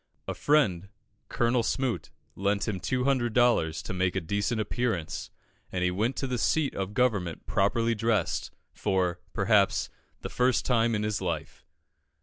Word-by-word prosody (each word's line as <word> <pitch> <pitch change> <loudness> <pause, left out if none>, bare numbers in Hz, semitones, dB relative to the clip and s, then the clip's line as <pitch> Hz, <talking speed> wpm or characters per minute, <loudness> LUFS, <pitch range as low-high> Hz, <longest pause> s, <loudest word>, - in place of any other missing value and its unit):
A - - -2
friend, 100 - +2 0.4
Colonel 120 +1 +2
Smoot, 125 +1 -1 0.3
lent 100 +2 0
him 100 -4 -2
200 125 0 0
dollars 120 -10 +2
to - - -5
make 90 0 0
a - - +2
decent 100 +6 -1
appearance, 110 -6 -2 0.4
and 90 -1 -1
he 90 - +2
went 110 +8 0
to - - -2
the 125 -2 -2
seat 155 +2 +1
of 95 +1 -4
government 105 -10 0
properly 115 +4 +1
dressed, 110 -4 0 0.2
for, 90 -3 0
perhaps, 100 -1 +2 0.3
the - - -5
first 125 0 +1
time 115 -2 +2
in 105 - -1
his 105 -1 -1
life. 90 -3 -4
105 Hz, 150 wpm, -28 LUFS, 95-120 Hz, 0.4 s, friend